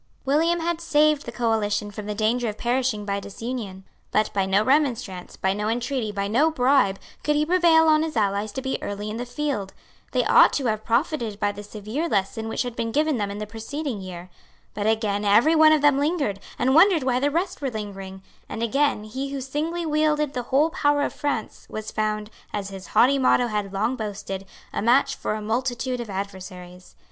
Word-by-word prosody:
William 325 +5 +2
had 340 0 -1
saved 305 -3 +2
the - - -4
coalition 215 -3 0
from 205 0 -7
the 210 - -3
danger 225 +3 +1
of 210 - -6
perishing 240 -3 0
by 200 0 -1
disunion. 200 -1 -6 0.3
But 215 0 +1
by 195 -1 +1
no 195 +2 +3
remonstrance, 245 -9 0
by 190 0 +1
no 210 +1 -2
entreaty, 240 -1 -1
by 200 -1 -2
no 255 +10 +3
bribe, 255 -9 +3 0.3
could 300 - +1
he 300 +1 +2
prevail 340 -1 +5
on 310 -1 +5
his 315 -5 -3
allies 205 0 0
to 265 - -4
be 265 - -2
early 205 +1 -4
in 220 - -5
the 245 +1 -5
field. 245 -7 -3 0.4
They - - +1
ought - - +6
to 275 - -1
have 215 -2 0
profited 235 -3 0
by 205 - +1
the 205 0 -9
severe 215 +10 -4
lesson 210 +1 -1
which 225 - -1
had 245 -2 -5
been 230 -1 -2
given 300 +1 +1
them 205 -2 -1
in 200 - -5
the 210 - -4
preceding 225 +2 -5
year. 180 -1 -9 0.4
But 205 0 -2
again 215 -2 +1
every 215 +10 +5
one 310 0 +7
of 310 -2 +3
them 290 -2 +5
lingered, 285 - 0 0.2
and 260 +2 +2
wondered 335 -1 +6
why 255 -1 +1
the 285 +2 +2
rest 340 +4 -2
were 275 - -1
lingering; 195 -4 -7 0.3
and 225 - -4
again 270 -1 +1
he 265 +6 -5
who 280 - -3
singly 310 +6 -3
wielded 300 -1 +1
the 250 - -2
whole 295 +5 +3
power 290 -5 +2
of - - -2
France 285 -7 -3
was 215 0 -6
found, 215 0 -2 0.2
as 200 -1 -4
his 195 -1 -9
haughty 275 +3 +4
motto 255 -1 +4
had 210 -4 -2
long 210 +6 0
boasted, 195 -3 -5 0.3
a - - -1
match 240 +6 +3
for 215 - -3
a 215 - -5
multitude 245 +3 -1
of 235 -2 -6
adversaries. 185 -2 -7
230 Hz, 205 wpm, -24 LUFS, 205-285 Hz, 0.4 s, one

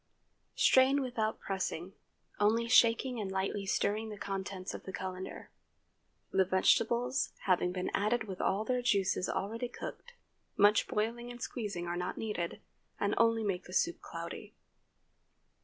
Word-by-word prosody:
Strain 265 +2 +5
without 225 -4 -1
pressing, 190 -1 -3 0.5
only 225 +3 +3
shaking 240 +1 +4
and 195 -3 -3
lightly 195 +1 -2
stirring 215 +3 0
the 210 - -7
contents 195 -1 -4
of - - -6
the 190 - -5
cullender. 185 0 -6 0.8
The 190 - +4
vegetables 235 +7 +2
having 180 -1 +2
been 180 0 -3
added 220 +3 +1
with 190 -4 -6
all 205 +3 +1
their 250 +1 0
juices 195 -6 +1
already 230 +5 -2
cooked, 485 - -8 0.4
much 205 +1 +5
boiling 235 +3 -2
and 240 0 -8
squeezing 210 -8 -4
are 175 0 -2
not 180 +1 -3
needed, 210 -6 -3 0.4
and 200 0 +1
only 230 -1 +4
make 195 -4 -2
the 180 - -10
soup 345 - +1
cloudy. - - -7
210 Hz, 140 wpm, -32 LUFS, 190-235 Hz, 0.8 s, Strain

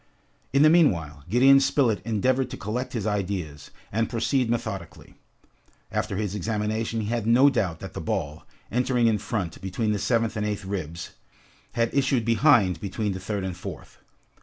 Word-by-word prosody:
In 140 +2 +4
the 155 - +7
meanwhile, 85 - +2
Gideon 135 +4 +6
Spilett 130 -7 +2
endeavored 125 +4 +1
to - - -7
collect 120 +5 -4
his 110 -4 -3
ideas, 95 -8 -3 0.2
and 115 +2 0
proceed 120 +1 0
methodically. 110 -7 -4 0.8
After - - -2
his 100 -1 -2
examination 110 +2 -2
he 105 - -3
had 115 -2 -1
no 130 +5 +6
doubt 90 -10 -1
that - - -8
the - - -5
ball, 75 +1 -3 0.3
entering 125 0 +1
in 110 -2 +3
front, 95 -6 -4
between 95 +4 -1
the 105 - -1
seventh 115 -1 0
and 105 - -2
eighth 105 -2 -3
ribs, 85 -4 -5 0.6
had 115 -1 0
issued 135 -4 +1
behind 115 - +4
between 105 +2 -2
the 95 - -4
third 100 +1 -3
and 95 -2 -4
fourth. 90 - -9
110 Hz, 165 wpm, -25 LUFS, 95-120 Hz, 0.8 s, the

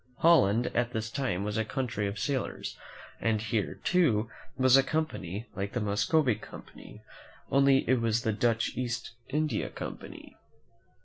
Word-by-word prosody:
Holland, 120 -9 +4
at 120 0 0
this 110 0 -3
time, 115 -9 -1
was 105 +1 -2
a - - +2
country 115 -3 -2
of 100 +1 -4
sailors, 130 +5 -3 0.4
and 110 -1 +1
here, 110 -1 -2
too, 125 -11 +2 0.3
was 130 0 +5
a 135 - +8
company 135 - -3
like 100 0 -4
the 120 - 0
Muscovy 120 - +2
Company, 105 - -12 0.5
only 135 0 +4
it 130 -2 +3
was 115 0 +1
called 110 -3 +1
.i^^ - - -15
the 120 - +5
Dutch 115 -1 0
East 120 -1 -3 0.2
India 150 -4 -1
Company. - - -8
120 Hz, 160 wpm, -29 LUFS, 105-135 Hz, 0.5 s, a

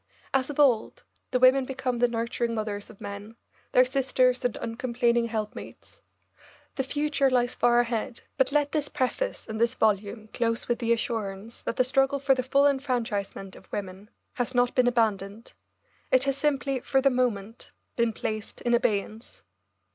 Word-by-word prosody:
As 265 0 +1
of 290 - -6
old, 255 -7 +2 0.3
the - - +1
women 255 +1 +5
become 255 -2 -3
the 245 - +4
nurturing 235 0 -2
mothers 210 -2 -4
of 215 - -15
men, 200 +2 -8 0.4
their 255 - +6
sisters 255 -1 +1
and 245 -2 -1
uncomplaining 235 0 0
helpmates. 215 -2 -7 0.7
The - - -1
future 290 0 +1
lies 245 -1 +1
far 240 0 +3
ahead, 235 0 -3
but 265 0 +2
let 290 0 +1
this 300 -2 -1
preface - - -2
and 220 0 -4
this 235 +2 +2
volume 215 0 0
close 230 0 -1
with 240 -1 0
the 235 -1 0
assurance 225 -3 -3
that - - -3
the 255 - +3
struggle 270 +2 +2
for 275 0 +3
the 260 - 0
full 275 +3 +3
enfranchisement 235 -8 -1
of - - -17
women 195 +1 -6 0.2
has 245 0 -3
not 245 0 +3
been 250 -1 +3
abandoned; 220 -3 -1 0.6
it 260 0 +4
has 275 -1 0
simply, 275 -2 0
for 270 +2 +1
the 275 0 +3
moment, 230 -3 -2 0.3
been 235 -1 +2
placed 215 0 -5
in 240 - 0
abeyance. 215 0 -1
240 Hz, 165 wpm, -27 LUFS, 220-265 Hz, 0.7 s, their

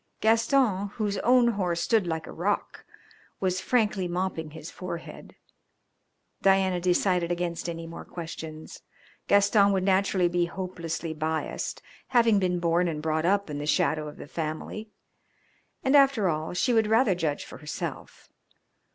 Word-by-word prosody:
Gaston, 225 -2 +2
whose 205 -3 -1
own 245 0 +4
horse 180 -6 -1
stood 215 -1 +2
like 160 -1 -2
a - - -9
rock, 200 +5 -2 0.5
was 185 -1 0
frankly 210 -6 +1
mopping 175 -3 -2
his 160 +2 -9
forehead. 170 -2 -8 1.1
Dianna 190 -2 +3
decided 180 -1 +1
against 175 -1 -2
any 165 0 -5
more 165 0 -8
questions. 160 -2 -8 0.5
Gaston 200 0 +5
would 190 -1 +1
naturally 190 -1 +2
be 175 0 +1
hopelessly 170 -3 -4
biased, 160 +1 -3 0.2
having 230 -5 +4
been 180 -2 0
born 170 +1 +2
and 160 -3 -2
brought 160 +1 0
up 200 +1 +2
in 145 -2 -5
the 145 - -4
shadow 155 -2 +1
of 150 - -9
the - - -8
family, 160 +8 -5 0.9
and 265 +2 +3
after 270 -8 +5
all 155 +1 -2
she 240 +7 +2
would 220 -2 +3
rather 220 -1 +4
judge 160 -5 -2
for - - -11
herself. 150 - -7
180 Hz, 145 wpm, -27 LUFS, 165-205 Hz, 1.1 s, Gaston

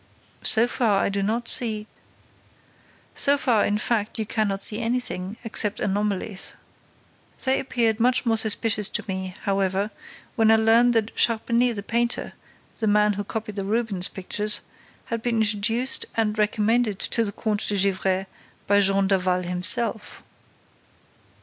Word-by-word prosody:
"So 230 +1 +5
far, 220 -5 +1
I - - +1
do 200 0 -2
not 225 +4 -2
see—" 215 -3 +1 1.3
"So 280 +1 +3
far, 240 -6 +2
in 205 - 0
fact, 215 0 -1
you 220 - -1
cannot 200 -2 -1
see 215 - +4
anything, 230 -4 -3
except 215 -2 -1
anomalies. 200 -1 -2 0.9
They 265 0 +4
appeared 235 -4 0
much 250 +2 +2
more 225 -1 +2
suspicious 215 -1 +1
to - - -3
me, 190 -1 -5
however, 195 +1 -1 0.4
when 225 -3 +3
I 225 - +6
learned 230 +2 +4
that 225 -1 -1
Charpenais 235 +1 +2
the 200 - -6
painter, 235 +3 -1 0.5
the 220 - -1
man 210 0 +3
who 205 +1 -4
copied 215 0 -6
the 195 - -2
Rubens 205 -3 -1
pictures, 210 +2 -2 0.4
had 230 -1 -4
been 235 -1 -1
introduced 220 +4 0
and 215 -2 0
recommended 215 +1 +1
to 230 - +1
the 205 - -1
Comte 210 0 -2
de 205 - 0
Gesvres 190 -1 0 0.4
by 205 0 +3
Jean 195 0 +2
Daval 185 -2 +1
himself." 205 +5 0
215 Hz, 145 wpm, -24 LUFS, 200-230 Hz, 1.3 s, I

